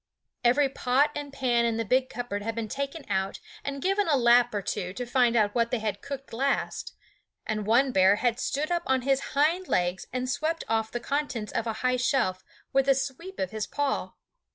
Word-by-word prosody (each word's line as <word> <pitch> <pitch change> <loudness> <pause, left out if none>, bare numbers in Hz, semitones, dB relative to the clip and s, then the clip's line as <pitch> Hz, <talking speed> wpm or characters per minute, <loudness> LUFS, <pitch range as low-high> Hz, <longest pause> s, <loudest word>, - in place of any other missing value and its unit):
Every 265 +4 +4
pot 270 +2 +2
and 290 -1 -5
pan 250 -4 +1
in 230 -1 +1
the 225 - -1
big 255 +5 +2
cupboard 240 -5 -4
had 225 +2 -3
been 230 -1 -3
taken 280 +5 -4
out 190 -1 -1 0.2
and 280 -1 -4
given 390 +1 +2
a 295 -3 +4
lap 240 0 +5
or 205 -2 -3
two 185 -3 -3
to 245 +4 -4
find 245 -1 +2
out 210 -2 +3
what 235 -1 +1
they 250 - 0
had 215 -2 -3
cooked 275 -3 -7
last; 275 +4 -1 0.5
and 215 -1 -2
one 255 +4 +4
bear 190 -2 +5
had 240 +2 0
stood 300 +4 -1
up 345 -1 +1
on 260 -1 +2
his 270 0 +2 0.2
hind 335 +6 +2
legs 180 +1 0
and 255 +1 -2
swept 315 +5 -1
off 220 -1 0
the 240 - -4
contents 260 -6 -2
of 230 - -1
a 225 - -1
high 255 0 +3
shelf 245 -8 +1 0.3
with 270 0 +3
a 275 - +6
sweep 275 +8 -4
of 280 - -2
his 215 -1 -3
paw. 285 -1 -2
250 Hz, 210 wpm, -27 LUFS, 225-275 Hz, 0.5 s, a